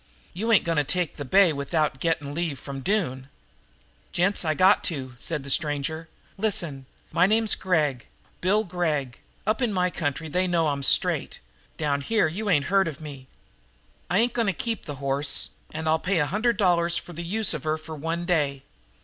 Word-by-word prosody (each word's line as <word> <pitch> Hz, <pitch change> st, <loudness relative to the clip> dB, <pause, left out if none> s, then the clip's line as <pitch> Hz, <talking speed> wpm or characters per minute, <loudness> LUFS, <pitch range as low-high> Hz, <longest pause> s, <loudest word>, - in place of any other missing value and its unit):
"You 220 Hz, +6 st, -1 dB
ain't 220 Hz, -, +5 dB
going 165 Hz, -2 st, +1 dB
to -, -, +2 dB
take 175 Hz, +3 st, -1 dB
the 145 Hz, -, -5 dB
bay 185 Hz, +4 st, +5 dB
without 145 Hz, 0 st, -1 dB
getting 145 Hz, -2 st, -1 dB
leave 165 Hz, -3 st, -2 dB
from 135 Hz, +2 st, -7 dB
Doone?" 135 Hz, -6 st, -1 dB, 0.8 s
"Gents, 190 Hz, +3 st, +2 dB
I 155 Hz, -2 st, 0 dB
got 185 Hz, +5 st, +5 dB
to," 135 Hz, -7 st, -3 dB
said 150 Hz, -1 st, -4 dB
the 140 Hz, -, -5 dB
stranger. 155 Hz, +3 st, 0 dB, 0.3 s
"Listen! 170 Hz, -11 st, -2 dB, 0.2 s
My 180 Hz, +2 st, +4 dB
name's 220 Hz, 0 st, +4 dB
Gregg, 150 Hz, -9 st, 0 dB, 0.3 s
Bill 205 Hz, +4 st, +2 dB
Gregg. 155 Hz, -, -2 dB, 0.3 s
Up 215 Hz, +5 st, 0 dB
in 240 Hz, -3 st, +1 dB
my 180 Hz, -2 st, +1 dB
country 160 Hz, 0 st, -3 dB
they 180 Hz, +4 st, 0 dB
know 165 Hz, -3 st, +2 dB
I'm 140 Hz, -1 st, -2 dB
straight; 135 Hz, -, +3 dB, 0.4 s
down 140 Hz, -1 st, 0 dB
here 220 Hz, +5 st, +2 dB
you 200 Hz, +7 st, -4 dB
ain't 145 Hz, -6 st, +3 dB
heard 195 Hz, -1 st, +2 dB
of 155 Hz, -2 st, -5 dB
me. 140 Hz, -4 st, -9 dB, 0.8 s
I 180 Hz, -, +2 dB
ain't 235 Hz, +2 st, +2 dB
going 230 Hz, -3 st, 0 dB
to 195 Hz, -, +2 dB
keep 230 Hz, -4 st, -3 dB
that 145 Hz, -, -5 dB
hoss, 140 Hz, +1 st, 0 dB, 0.2 s
and 160 Hz, +1 st, -5 dB
I'll 160 Hz, 0 st, +3 dB
pay 190 Hz, +2 st, 0 dB
a 150 Hz, -, +3 dB
hundred 220 Hz, +7 st, 0 dB
dollars 175 Hz, -4 st, +2 dB
for 175 Hz, -, -7 dB
the 170 Hz, +2 st, -6 dB
use 210 Hz, +5 st, 0 dB
of -, -, -5 dB
her 155 Hz, 0 st, 0 dB
for 160 Hz, 0 st, -10 dB
one 165 Hz, +3 st, -3 dB
day. 145 Hz, -6 st, 0 dB
165 Hz, 190 wpm, -25 LUFS, 145-190 Hz, 0.8 s, ain't